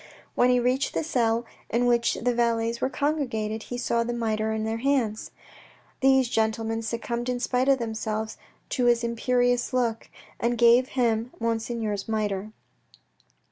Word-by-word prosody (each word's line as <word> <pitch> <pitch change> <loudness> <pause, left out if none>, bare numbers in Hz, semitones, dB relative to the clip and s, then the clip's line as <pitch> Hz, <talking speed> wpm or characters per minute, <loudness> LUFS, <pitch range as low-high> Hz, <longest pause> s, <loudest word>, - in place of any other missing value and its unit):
When 245 - +3
he 250 0 +4
reached 250 +3 0
the - - 0
cell 235 -6 +1 0.2
in 235 +2 +1
which 235 -1 +2
the 245 +1 0
valets 230 -1 0
were 260 - +1
congregated, 250 -8 -1
he 245 - -3
saw 235 -1 0
the 240 +1 -3
mitre 220 -2 -1
in 220 0 -2
their 220 +1 -2
hands. 245 -5 0 0.7
These 265 -1 +4
gentlemen 225 0 0
succumbed 235 +2 -3
in 250 -1 -1
spite 255 +2 +1
of 270 - +5
themselves 220 -2 -3 0.3
to 250 - 0
his 240 -1 +3
imperious 245 +1 +1
look, 235 -3 -1 0.3
and 240 +1 0
gave 240 +2 +5
him 230 -1 +1
Monseigneur's 225 -3 -2
mitre. 210 -1 -2
235 Hz, 150 wpm, -26 LUFS, 225-245 Hz, 0.7 s, of